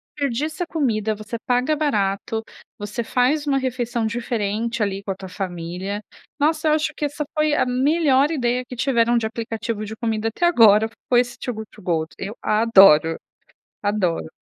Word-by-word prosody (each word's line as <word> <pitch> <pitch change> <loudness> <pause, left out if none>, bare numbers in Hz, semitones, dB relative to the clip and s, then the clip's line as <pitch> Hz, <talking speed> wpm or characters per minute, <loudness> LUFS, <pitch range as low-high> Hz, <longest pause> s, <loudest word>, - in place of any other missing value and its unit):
desperdiça 295 +4 -2
comida, 220 -10 0
você 215 +2 -7
paga 250 +5 +2
barato, 220 -6 -1 0.3
você 210 +3 -4
faz 275 +6 +1
uma 275 -1 +2
refeição 245 -3 -2
diferente, 230 -1 -2
ali, 195 -1 -3
com 195 - -3
a - - -3
tua 190 0 -9
família. 185 +1 -5 0.4
Nossa, 310 +2 +1
eu - - +4
acho 310 0 0
que 295 - -2
essa 290 +1 -3
foi 305 -1 +2
a - - +2
melhor 275 +2 +2
ideia 250 -4 0
que 250 - -7
tiveram 240 -2 +2
de 230 - 0
aplicativo 225 -1 -4
de 220 +2 -7
comida 225 -1 -1
até 345 +10 -1
agora, 220 -9 +6 0.2
foi 245 -1 +5
esse 245 -1 -6
Too 245 - -3
Good 220 0 -7
to 210 - -16
Go, 165 -3 0
eu 205 +4 -5
adoro, 195 -8 +5 0.6
adoro. 195 -6 -1
230 Hz, 170 wpm, -22 LUFS, 210-270 Hz, 0.6 s, agora